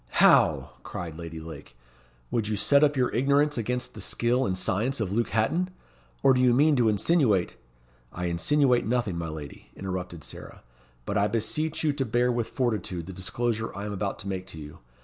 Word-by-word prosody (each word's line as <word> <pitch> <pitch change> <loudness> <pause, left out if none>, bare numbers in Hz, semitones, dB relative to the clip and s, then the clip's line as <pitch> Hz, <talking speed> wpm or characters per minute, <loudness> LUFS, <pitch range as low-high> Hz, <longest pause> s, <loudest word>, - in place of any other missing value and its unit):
"How!" - - +4
cried 85 -3 -6
Lady 80 -1 -7
Lake. 80 -6 -10 0.5
"Would 110 -3 0
you 110 - -1
set 140 +8 +4
up 145 -1 +3
your 125 -2 +1
ignorance 140 +4 +2
against 125 +2 -2
the 105 - -9
skill 120 +6 +1
and 95 - -1
science 105 +9 0
of 105 -4 -1
Luke 115 +3 0
Hatton? 165 +12 +1 0.5
Or 135 - +6
do 125 - +2
you 125 -1 +5
mean 150 +3 +4
to 120 -3 +4
insinuate 105 - +2 0.3
" - - -34
"I 90 - -4
insinuate 120 - +2
nothing, 115 -6 0
my 85 -1 -3
lady," 75 -3 -9
interrupted 90 -4 -5
Sarah; - - -9 0.4
"but 100 - 0
I 100 - +3
beseech 150 +10 -1
you 150 -2 +2
to 140 -1 -1
bear 120 +1 +1
with 120 -2 -1
fortitude 105 -9 -2
the 95 - -8
disclosure 115 +4 -2
I 100 - -4
am 105 - -4
about 100 0 -2
to 100 - -8
make 95 -1 -4
to 90 - -10
you. 75 -1 -10
110 Hz, 195 wpm, -27 LUFS, 90-125 Hz, 0.5 s, Or